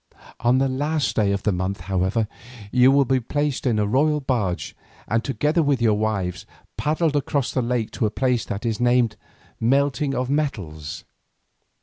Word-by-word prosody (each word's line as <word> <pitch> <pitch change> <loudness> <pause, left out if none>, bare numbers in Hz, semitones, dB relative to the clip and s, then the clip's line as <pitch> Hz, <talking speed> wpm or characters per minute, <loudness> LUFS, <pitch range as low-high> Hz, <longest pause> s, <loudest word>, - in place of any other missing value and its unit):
On 120 +2 +3
the 135 +1 +2
last 145 +1 -1
day 105 -3 +2
of 100 -1 -2
the 105 - +2
month, 95 +1 -2
however, 95 +4 0 0.4
you 125 +1 +5
will 140 0 +4
be 130 +1 +2
placed 145 +2 -2
in 115 -3 +2
a 105 - +2
royal 150 +8 +2
barge 115 -10 -2 0.3
and 115 +2 0
together 150 +4 +1
with 140 -4 +2
your 115 -2 +3
wives, 100 -5 -2 0.3
paddled 155 0 0
across 140 -2 0
the 130 - 0
lake 120 -2 -1
to 110 - 0
a - - -1
place 125 +1 0
that 100 +4 -5
is 110 -3 -1
named 120 -2 +3 0.4
'Melting 135 +3 +1
of 125 +1 -1
Metals. 100 - -3
125 Hz, 175 wpm, -23 LUFS, 105-140 Hz, 0.4 s, you